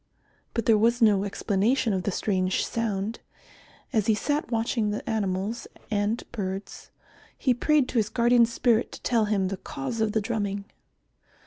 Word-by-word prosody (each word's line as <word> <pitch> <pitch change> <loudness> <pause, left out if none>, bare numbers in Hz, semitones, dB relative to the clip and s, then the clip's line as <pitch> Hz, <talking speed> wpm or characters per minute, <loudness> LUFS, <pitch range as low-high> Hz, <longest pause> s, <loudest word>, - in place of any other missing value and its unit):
But 230 - 0
there 220 -2 +5
was 235 +2 +3
no 205 -4 +4
explanation 215 +4 +1
of 190 - 0
the 200 - -1
strange 185 -1 0
sound. 220 -1 -2 0.7
As 215 -4 +1
he 220 - +4
sat 290 +6 -1
watching 225 -1 0
the 210 - -4
animals 210 +1 -2 0.2
and 210 +2 0
birds, 195 -3 -5 0.5
he 255 - +2
prayed 285 +2 +2
to 240 - +1
his 215 -1 0
guardian 235 0 +4
spirit 235 -1 +1
to - - -9
tell 230 -3 +2
him 200 -3 0
the 195 - -3
cause 185 - -5
of 215 -1 +1
the 220 - +1
drumming. 205 -2 -2
220 Hz, 160 wpm, -26 LUFS, 200-235 Hz, 0.7 s, there